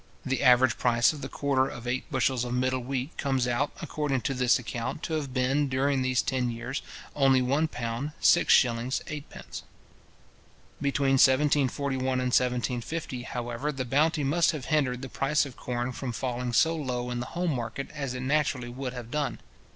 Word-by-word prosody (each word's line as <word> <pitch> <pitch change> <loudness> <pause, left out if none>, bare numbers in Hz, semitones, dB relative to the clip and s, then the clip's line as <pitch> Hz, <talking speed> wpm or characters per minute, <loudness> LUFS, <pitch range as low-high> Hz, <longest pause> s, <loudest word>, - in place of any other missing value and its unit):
The 135 -2 -1
average 125 0 +5
price 120 +3 +3
of 150 - -9
the 135 - -5
quarter 135 -2 +1
of 120 - -9
eight 125 +4 -2
bushels 130 -3 +1
of 125 0 -3
middle 130 +1 +1
wheat 130 +3 -4
comes 135 -3 +1
out, 125 +4 +1
according 145 -4 -1
to 135 - -1
this 125 -2 +3
account, 120 +3 -5
to 160 - -3
have 145 -4 -2
been, 135 +3 +1
during 135 +1 +1
these 130 0 +1
ten 130 -2 0
years, 120 +4 -4 0.3
only 135 -2 +4
£ - - 0 0.2
1:6:8. 125 +2 +1 1.2
Between 140 -1 +1
1741 140 -1 +2
and 125 0 0
1750, 125 +2 -1
however, 120 +3 -3
the 135 -3 -4
bounty 150 +4 +2
must 160 +5 +3
have 145 -5 -5
hindered 130 -4 +1
the - - -4
price 145 +3 +1
of 135 -4 -9
corn 120 0 -3
from 125 0 -4
falling 125 +1 -3
so 160 +8 +3
low 125 -5 -3
in 120 - -2
the 120 - -4
home 175 -3 +1
market 120 +2 -4
as 140 -4 -4
it 130 - -4
naturally 135 -3 0
would 130 +1 -5
have 120 -2 -8
done. 150 -1 -1
130 Hz, 170 wpm, -28 LUFS, 125-140 Hz, 1.2 s, average